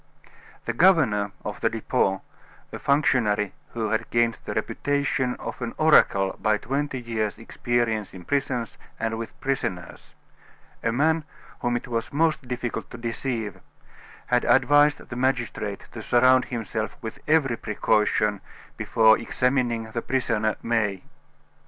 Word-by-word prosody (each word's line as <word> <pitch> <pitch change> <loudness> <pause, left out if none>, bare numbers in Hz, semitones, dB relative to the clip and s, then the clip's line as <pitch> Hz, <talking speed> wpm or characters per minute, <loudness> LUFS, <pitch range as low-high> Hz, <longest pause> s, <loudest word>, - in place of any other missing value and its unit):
XI - - -29 0.3
The 120 - -1
governor 120 - +4
of - - -5
the - - +3
Depot, 95 0 0 0.5
a - - -6
functionary 115 -8 +2 0.2
who 110 -2 -2
had 110 +1 -1
gained 120 -1 +1
the - - -4
reputation 140 -3 0
of - - -7
an 120 -1 -4
oracle 100 -11 +4
by 110 0 +3
twenty 135 +3 -2
years' 110 -3 -2
experience 115 -2 -1
in 90 -2 -11
prisons 130 -5 -2 0.2
and 115 0 -2
with 115 - -7
prisoners 115 -10 -4 0.7
a 115 - 0
man 155 +6 +2 0.4
whom 120 0 0
it 120 - -7
was 115 -2 -3
most 155 -3 +1
difficult 125 -1 -4
to - - -9
deceive 115 -3 -3 0.7
had 125 -1 +2
advised 145 +3 +5
the 120 - -7
magistrate 120 -5 -1
to 110 - -7
surround 125 +3 +4
himself 110 -2 -4
with 110 - -6
every 150 -6 +3
precaution 105 -1 +1 0.4
before 110 -1 +4
examining 120 -2 0
the 115 - -2
prisoner, 115 -5 0
May. 105 -5 0
120 Hz, 135 wpm, -25 LUFS, 110-130 Hz, 0.7 s, advised